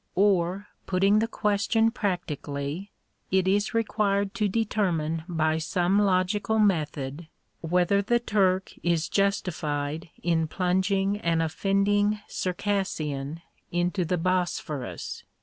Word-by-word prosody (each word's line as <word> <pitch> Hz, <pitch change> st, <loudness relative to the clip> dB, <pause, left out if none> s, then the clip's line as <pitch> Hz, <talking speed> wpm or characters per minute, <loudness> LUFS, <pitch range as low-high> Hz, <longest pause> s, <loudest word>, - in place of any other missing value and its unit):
Or, 190 Hz, 0 st, +2 dB, 0.2 s
putting 195 Hz, +3 st, +3 dB
the 225 Hz, -, +1 dB
question 225 Hz, +1 st, +1 dB
practically, 170 Hz, -, -3 dB, 0.4 s
it 190 Hz, 0 st, +2 dB
is 205 Hz, +3 st, +1 dB
required 205 Hz, -3 st, +1 dB
to 215 Hz, -3 st, +1 dB
determine 180 Hz, -7 st, 0 dB
by 160 Hz, -2 st, +1 dB
some 180 Hz, +4 st, +1 dB
logical 200 Hz, +2 st, +1 dB
method, 155 Hz, -6 st, 0 dB, 0.3 s
whether 180 Hz, +4 st, +2 dB
the 240 Hz, +4 st, +2 dB
Turk 190 Hz, -5 st, +1 dB
is 170 Hz, -2 st, +1 dB
justified 160 Hz, -6 st, -1 dB
in 165 Hz, -1 st, +1 dB
plunging 190 Hz, +3 st, +1 dB
an 170 Hz, -5 st, 0 dB
offending 200 Hz, +5 st, +1 dB
Circassian 165 Hz, -6 st, -2 dB, 0.3 s
into 175 Hz, +2 st, 0 dB
the 180 Hz, +2 st, 0 dB
Bosphorus? 165 Hz, -, -2 dB
185 Hz, 105 wpm, -27 LUFS, 165-200 Hz, 0.4 s, putting